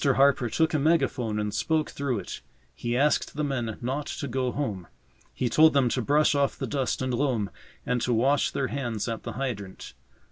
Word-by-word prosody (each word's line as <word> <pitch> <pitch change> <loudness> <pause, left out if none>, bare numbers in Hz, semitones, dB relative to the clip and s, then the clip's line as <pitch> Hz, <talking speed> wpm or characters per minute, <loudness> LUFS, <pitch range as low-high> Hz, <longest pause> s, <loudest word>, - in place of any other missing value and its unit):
Harper 135 -3 +4
took 160 +8 +1
a 155 - +2
megaphone 135 -8 +1
and 105 -1 -2
spoke 155 +7 0
through 140 -4 -2
it. - - -6 0.3
He 120 0 -2
asked 145 +2 +2
the 150 - -1
men 120 -6 -2
not 135 +4 -2
to 145 - -4
go 130 0 -1
home. 105 -12 -3 0.4
He 125 - -1
told 155 +6 +5
them 135 -3 +3
to 125 - 0
brush 150 +4 +3
off 140 -1 +1
the - - -3
dust 130 -2 -1
and 130 -1 -1
loam 120 -7 0 0.3
and 125 -1 0
to 125 - 0
wash 135 +5 +3
their 135 -2 -2
hands 120 -7 -3
at 115 -1 -3
the - - -6
hydrant. 110 -8 -5
130 Hz, 200 wpm, -27 LUFS, 120-145 Hz, 0.4 s, told